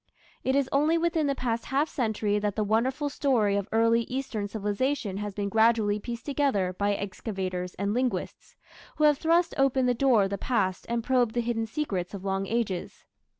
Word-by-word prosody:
It 260 Hz, -, +1 dB
is 280 Hz, -2 st, +2 dB
only 300 Hz, +4 st, +3 dB
within 330 Hz, -2 st, +1 dB
the 275 Hz, -, 0 dB
past 235 Hz, -3 st, -2 dB
half 280 Hz, +3 st, +1 dB
century 215 Hz, -6 st, -1 dB
that 205 Hz, -1 st, -2 dB
the 215 Hz, -, 0 dB
wonderful 255 Hz, +7 st, 0 dB
story 250 Hz, -8 st, +1 dB
of 200 Hz, -1 st, -1 dB
early 230 Hz, +1 st, +3 dB
Eastern 250 Hz, -6 st, -3 dB
civilization 210 Hz, +1 st, -2 dB
has 205 Hz, -1 st, -5 dB
been 205 Hz, -1 st, -2 dB
gradually 220 Hz, -1 st, +3 dB
pieced 235 Hz, +2 st, -6 dB
together 270 Hz, -11 st, 0 dB
by 200 Hz, +2 st, 0 dB
excavators 185 Hz, -2 st, -4 dB
and 200 Hz, +1 st, -1 dB
linguists, 250 Hz, +1 st, -3 dB, 0.4 s
who 305 Hz, -, -1 dB
have 295 Hz, -2 st, +5 dB
thrust 335 Hz, +1 st, +2 dB
open 270 Hz, -1 st, +3 dB
the 250 Hz, -, +3 dB
door 245 Hz, -4 st, +3 dB
of 195 Hz, -, -2 dB
the 200 Hz, -, -3 dB
past 195 Hz, -7 st, -1 dB
and 235 Hz, -1 st, -1 dB
probed 245 Hz, -2 st, +1 dB
the 240 Hz, -, +2 dB
hidden 230 Hz, -1 st, -2 dB
secrets 205 Hz, -, -3 dB
of 195 Hz, 0 st, -8 dB
long 195 Hz, 0 st, -1 dB
ages. 215 Hz, -6 st, -3 dB
225 Hz, 190 wpm, -27 LUFS, 200-265 Hz, 0.4 s, have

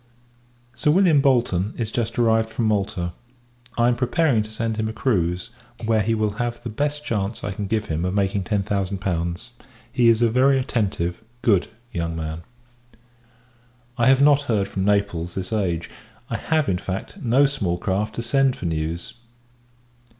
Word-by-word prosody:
Sir 120 Hz, +5 st, 0 dB
William 165 Hz, -3 st, +5 dB
Bolton 120 Hz, -7 st, +2 dB
is 115 Hz, -2 st, -2 dB
just 115 Hz, -2 st, -2 dB
arrived 115 Hz, -1 st, +3 dB
from 115 Hz, +1 st, -2 dB
Malta. 100 Hz, -5 st, 0 dB, 0.6 s
I 120 Hz, 0 st, +4 dB
am 120 Hz, -, +3 dB
preparing 125 Hz, 0 st, +2 dB
to 105 Hz, -, -6 dB
send 110 Hz, 0 st, -3 dB
him 110 Hz, 0 st, 0 dB
a -, -, -5 dB
cruise, 90 Hz, -7 st, 0 dB, 0.3 s
where 110 Hz, -1 st, +3 dB
he 115 Hz, +2 st, +1 dB
will 110 Hz, -1 st, 0 dB
have 120 Hz, 0 st, -3 dB
the 120 Hz, -, -4 dB
best 145 Hz, +5 st, -2 dB
chance 105 Hz, 0 st, -2 dB
I 105 Hz, -, -2 dB
can 100 Hz, 0 st, -4 dB
give 110 Hz, 0 st, 0 dB
him 80 Hz, +1 st, -2 dB
of 90 Hz, +1 st, -1 dB
making 100 Hz, -1 st, 0 dB
ten 100 Hz, +1 st, 0 dB
thousand 100 Hz, -1 st, -1 dB
pounds. 90 Hz, +3 st, -3 dB, 0.4 s
He 120 Hz, -2 st, +4 dB
is 115 Hz, +1 st, +4 dB
a 115 Hz, -, +4 dB
very 135 Hz, +3 st, +4 dB
attentive, 100 Hz, -9 st, -1 dB, 0.2 s
good, 100 Hz, -7 st, +3 dB, 0.3 s
young 85 Hz, -1 st, -2 dB
man. 80 Hz, 0 st, -4 dB, 1.5 s
I 120 Hz, -1 st, +2 dB
have 135 Hz, +1 st, +5 dB
not 145 Hz, -1 st, +6 dB
heard 100 Hz, -4 st, +2 dB
from 95 Hz, -1 st, -2 dB
Naples 100 Hz, -4 st, 0 dB
this 95 Hz, +3 st, -4 dB
age. 85 Hz, -6 st, -1 dB, 0.4 s
I -, -, 0 dB
have, 155 Hz, +6 st, 0 dB
in 90 Hz, -2 st, 0 dB
fact, 95 Hz, -, -5 dB
no 130 Hz, +2 st, +4 dB
small 100 Hz, -11 st, -1 dB
craft 95 Hz, +4 st, -2 dB
to 115 Hz, -, -3 dB
send 135 Hz, +2 st, +2 dB
for -, -, -7 dB
news. 80 Hz, +7 st, -3 dB
110 Hz, 175 wpm, -23 LUFS, 95-120 Hz, 1.5 s, not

